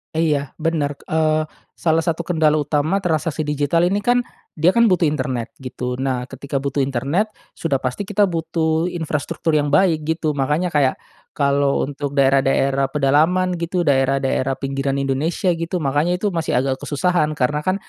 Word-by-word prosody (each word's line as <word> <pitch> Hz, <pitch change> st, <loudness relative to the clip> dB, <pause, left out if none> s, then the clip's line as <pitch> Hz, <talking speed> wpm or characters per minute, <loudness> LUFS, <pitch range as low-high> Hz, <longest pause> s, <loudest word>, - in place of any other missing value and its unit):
E 160 Hz, -1 st, +2 dB
iya 140 Hz, -2 st, -2 dB
benar, 155 Hz, -3 st, -1 dB
eee, 155 Hz, -1 st, +1 dB, 0.3 s
salah 160 Hz, -1 st, +1 dB
satu 170 Hz, 0 st, -1 dB
kendala 160 Hz, -3 st, +2 dB
utama 150 Hz, +5 st, 0 dB
transaksi 160 Hz, -2 st, -1 dB
digital 150 Hz, +3 st, +1 dB
ini 200 Hz, +3 st, +1 dB
kan 245 Hz, +3 st, +2 dB, 0.3 s
dia 165 Hz, +4 st, +4 dB
kan 235 Hz, -1 st, +4 dB
butuh 180 Hz, -3 st, +3 dB
internet 130 Hz, -5 st, -2 dB
gitu 125 Hz, -1 st, -4 dB
nah 130 Hz, -2 st, -1 dB
ketika 140 Hz, +2 st, -5 dB
butuh 140 Hz, +1 st, -1 dB
internet 140 Hz, -, 0 dB, 0.2 s
sudah 150 Hz, -5 st, -1 dB
pasti 130 Hz, +5 st, -3 dB
kita 205 Hz, 0 st, +2 dB
butuh 165 Hz, -1 st, -1 dB
infrastruktur 160 Hz, -1 st, -2 dB
yang 145 Hz, -1 st, +2 dB
baik 160 Hz, +1 st, +3 dB
gitu 160 Hz, 0 st, -1 dB
makanya 150 Hz, +5 st, 0 dB
kayak 140 Hz, -3 st, +2 dB, 0.4 s
kalau 140 Hz, -1 st, +2 dB
untuk 145 Hz, 0 st, -5 dB
daerah-daerah 135 Hz, 0 st, +2 dB
pedalaman 155 Hz, +6 st, +2 dB
gitu, 175 Hz, 0 st, -1 dB
daerah-daerah 135 Hz, -1 st, +1 dB
pinggiran 135 Hz, 0 st, -2 dB
Indonesia 145 Hz, +7 st, 0 dB
gitu 165 Hz, +2 st, -3 dB
makanya 155 Hz, +3 st, 0 dB
itu 205 Hz, 0 st, -1 dB
masih 165 Hz, -6 st, 0 dB
agak 130 Hz, +1 st, -1 dB
kesusahan 155 Hz, +2 st, +1 dB
karena 145 Hz, +4 st, 0 dB
kan 185 Hz, +4 st, 0 dB
150 Hz, 160 wpm, -20 LUFS, 135-165 Hz, 0.4 s, dia